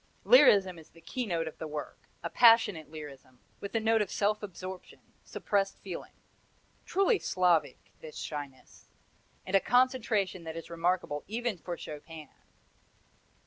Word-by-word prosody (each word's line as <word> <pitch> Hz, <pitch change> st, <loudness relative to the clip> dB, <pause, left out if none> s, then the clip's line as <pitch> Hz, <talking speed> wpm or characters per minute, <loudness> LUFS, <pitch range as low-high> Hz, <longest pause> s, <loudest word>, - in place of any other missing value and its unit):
Lyrism 195 Hz, -, +6 dB
is 160 Hz, -, -16 dB
the 165 Hz, -, -19 dB
keynote 175 Hz, -11 st, -3 dB
of 160 Hz, -, -9 dB
the 160 Hz, -, -5 dB
work, 150 Hz, -1 st, -8 dB
a -, -, -3 dB
passionate 225 Hz, -9 st, +5 dB
lyrism, 140 Hz, -4 st, -11 dB, 0.2 s
with 200 Hz, +2 st, -7 dB
a -, -, +3 dB
note 225 Hz, 0 st, +2 dB
of 205 Hz, -, -2 dB
self 210 Hz, +1 st, 0 dB
absorption, 185 Hz, -2 st, -8 dB, 0.2 s
suppressed 195 Hz, -1 st, -1 dB
feeling 185 Hz, -3 st, -8 dB, 0.7 s
truly 395 Hz, +3 st, +2 dB
Slavic, 170 Hz, -7 st, 0 dB
this 155 Hz, -1 st, -10 dB
shyness! 145 Hz, -3 st, -8 dB, 0.6 s
and 190 Hz, -, -1 dB
a -, -, +7 dB
concentration 230 Hz, -7 st, +1 dB
that 160 Hz, 0 st, -7 dB
is 165 Hz, -, -9 dB
remarkable 170 Hz, -3 st, -1 dB
even 235 Hz, +1 st, -2 dB
for 175 Hz, 0 st, -6 dB
Chopin. 155 Hz, 0 st, -9 dB
185 Hz, 140 wpm, -30 LUFS, 160-215 Hz, 0.7 s, a